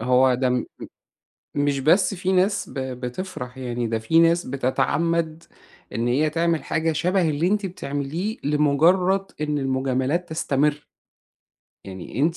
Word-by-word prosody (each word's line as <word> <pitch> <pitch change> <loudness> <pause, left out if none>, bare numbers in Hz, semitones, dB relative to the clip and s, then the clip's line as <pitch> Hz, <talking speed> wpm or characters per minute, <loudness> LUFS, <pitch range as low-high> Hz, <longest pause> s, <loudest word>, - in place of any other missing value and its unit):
هو 125 +2 +4
ده 130 +1 +1
م 125 - +2
م - - -7 0.9
مش 145 -1 +1
بس 170 +9 +3
في 185 0 -2
ناس 190 +1 +1
ب - - -12
بتِفرَح 125 +1 -5
يعني، 120 -2 -3
ده 115 0 -1
في 160 +9 +3
ناس 170 +1 +4
بتتعَمَّد 160 +5 0 0.5
إن 115 +1 -1
هي 145 +6 +2
تعمل 165 +1 0
حاجة 165 0 0
شبه 180 +2 +1
اللي 155 +3 0
أنتِ 205 +1 +1
بتعمليه 170 - -4
لمجرّد 165 +7 +3 0.2
إن 150 -1 0
المجاملات 135 +5 -1
تستمرّ. 150 -1 0 1.0
يعني 95 +5 -7
أنتِ 165 +3 +2
150 Hz, 140 wpm, -23 LUFS, 130-170 Hz, 1.0 s, هو